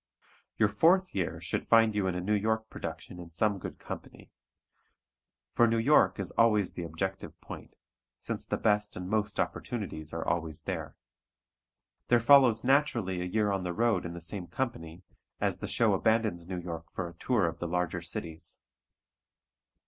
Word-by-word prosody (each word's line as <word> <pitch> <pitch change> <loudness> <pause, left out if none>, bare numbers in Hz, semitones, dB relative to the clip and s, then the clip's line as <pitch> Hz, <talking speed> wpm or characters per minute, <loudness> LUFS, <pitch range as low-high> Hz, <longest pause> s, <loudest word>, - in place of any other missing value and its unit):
Your 110 - +4
fourth 180 - +3
year 95 -4 -2
should - - -3
find 115 -1 +5
you 100 -2 0
in 90 - -1
a 90 - -2
New 105 +4 0
York 110 +1 0
production 90 - -7
in 85 -1 -9
some 100 +4 0
good - - -7
company. - - -9 1.2
For 120 - +4
New 115 0 +2
York 125 0 +4
is 95 - -2
always 105 -4 +3
the - - -5
objective 95 +4 -4
point, - - -10 0.4
since - - -4
the - - -1
best 105 -1 +1
and 90 0 -5
most 105 +1 -1
opportunities 85 -10 -3
are 80 0 -4
always 80 -3 -1
there. - - -4 1.1
There 120 - +5
follows 120 -2 +6
naturally 120 -9 +2
a - - -2
year 105 +3 +1
on 95 -1 0
the 90 -1 -3
road 115 -2 +2
in 85 - -5
the 85 - -7
same 90 +2 -4
company, 85 -5 -4 0.4
as - - 0
the - - -4
show - - +3
abandons 110 -6 +1
New 90 -1 -4
York 85 -2 -7
for 95 - -4
a 85 - -10
tour 105 +3 +1
of 85 0 -3
the 85 - -3
larger 90 0 -1
cities. 85 -1 -5
95 Hz, 170 wpm, -30 LUFS, 85-110 Hz, 1.2 s, follows